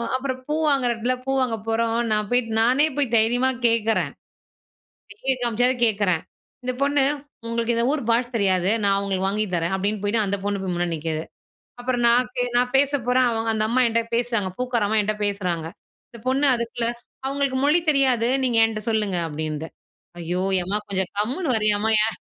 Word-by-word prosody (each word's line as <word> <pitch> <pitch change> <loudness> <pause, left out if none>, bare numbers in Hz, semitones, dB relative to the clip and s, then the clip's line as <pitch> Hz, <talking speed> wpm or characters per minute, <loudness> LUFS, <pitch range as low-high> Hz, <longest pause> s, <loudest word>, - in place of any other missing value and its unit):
அப்புறம் 260 -1 -3
பூ 300 - -1
வாங்குற 270 -4 +2
இடத்துல 240 +3 -1
பூ 270 - -1
வாங்க 240 -3 0
போறோம். 230 +1 0
நான் 210 -1 0
போயிட்டு 245 -2 +1
நானே 255 +6 +4
போய் 270 -5 +1
தைரியமா 245 +4 +3 0.2
கேட்கறேன். 225 -1 +1 1.1
சைக 265 0 +2
காமிச்சாது 245 +2 +2
கேட்கறேன். 200 -6 +1 0.4
இந்த 255 - -1
பொண்ணு, 285 -1 +3 0.4
"உங்களுக்கு 235 0 0
இந்த 235 - +1
ஊர் 295 -4 -1
பாஷ 235 +2 +2
தெரியாது. 190 -2 +2
நான் 195 0 +3
உங்களுக்கு 190 -1 -1
வாங்கி 210 +2 0
தரேன்." 170 +2 -1
அப்டின்னு 205 +1 -2
போயிட்டு 215 +1 +1
அந்த 200 +1 -1
பொண்ணு 205 -1 -2
போய் 180 -2 -3
முன்னாடி 175 -1 -1
நிக்கிது. 155 0 -3 0.6
அப்புறம் 245 -1 -1
நான் 245 +1 +4
கே 245 - +1
நான் 250 +1 +1
பேச 280 +1 +3 0.2
போறேன். 250 0 +3
அவங்க 225 0 -2
அந்த 215 -1 0
அம்மா 255 +2 +1
என்கிட்ட 230 0 -1
பேசுறாங்க, 230 -5 -1
பூக்கார 245 -4 0
அம்மா 220 - 0
என்கிட்ட 210 +1 -1
பேசுறாங்க. 180 -5 -2 0.4
இந்த 235 - -13
பொண்ணு 270 +3 +2
அதுக்குள்ள, 235 0 -3 0.4
"அவங்களுக்கு 275 -1 -1
மொழி 305 +4 +4
தெரியாது. 255 -5 +2 0.2
நீங்க 240 -3 +1
என்ட்ட 215 -1 -4
சொல்லுங்க." 210 -4 0
அப்டின்னுது. 155 +1 -4 0.5
ஐயோ! 175 +2 -3 0.2
ஏம்மா 190 +4 -2
கொஞ்சம் 190 -2 0
கம்முனு 255 - -1
வரையம்மா! 215 -1 +2
ஏன் 220 0 -1
225 Hz, 175 wpm, -23 LUFS, 200-250 Hz, 1.1 s, நானே